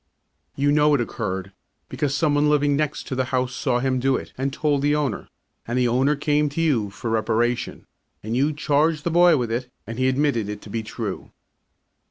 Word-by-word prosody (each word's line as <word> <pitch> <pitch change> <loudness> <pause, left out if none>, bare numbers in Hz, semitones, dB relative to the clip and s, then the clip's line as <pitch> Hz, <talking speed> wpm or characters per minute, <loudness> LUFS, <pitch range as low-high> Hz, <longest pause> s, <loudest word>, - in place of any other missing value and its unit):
You 145 +1 +2
know 150 0 +4
it - - 0
occurred, 95 -5 -4 0.4
because 140 -1 -2
some 150 0 +2
one 145 +1 +3
living 145 -1 +3
next 150 0 -1
to - - -5
the 130 0 0
house 130 -1 -1
saw 125 -1 0
him 130 0 0
do 135 +1 +2
it - - -6
and 135 +1 -2
told 145 0 0
the 145 +1 +2
owner, 145 -8 -2 0.4
and 120 +2 -1
the 125 -1 +3
owner 130 +5 +2
came 150 0 +1
to 145 - -5
you 135 -11 +1
for 110 +3 -5
reparation 115 +2 -1 0.4
and 110 +3 -3
you 140 +4 +2
charged 150 +1 +1
the 170 - -1
boy 175 -1 +5
with 120 -3 -2
it 125 +2 -2 0.2
and 115 +2 -7
he 130 - +2
admitted 130 -6 0
it 105 0 -5
to 105 - -11
be 115 - -2
true. 110 -2 -6
135 Hz, 210 wpm, -23 LUFS, 120-150 Hz, 0.4 s, boy